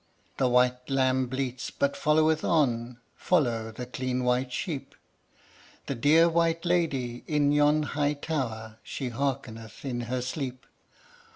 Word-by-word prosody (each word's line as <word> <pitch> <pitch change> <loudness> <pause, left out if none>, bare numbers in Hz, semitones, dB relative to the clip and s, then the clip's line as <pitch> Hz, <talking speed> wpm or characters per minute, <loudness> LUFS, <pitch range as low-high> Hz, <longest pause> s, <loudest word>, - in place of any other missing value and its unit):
The 130 -2 +2
white 125 +1 +2
lamb 130 -1 +2
bleats 130 -1 -3
but 140 0 0
followeth 155 +1 +2
on 125 -6 +1 0.2
Follow 120 -10 +1
the 125 +3 -6
clean 125 0 -2
white 125 +1 +1
sheep. 145 +1 -4 0.9
The - - -2
dear 150 +7 +5
white 165 0 +1
lady 140 -9 0
in 145 -2 +2
yon 150 +1 +4
high 145 0 0
tower, 115 -8 -4
She 130 -3 -5
hearkeneth 120 -3 -4
in 120 -3 -2
her 125 -1 -1
sleep. 130 -1 -4
130 Hz, 130 wpm, -28 LUFS, 125-150 Hz, 0.9 s, dear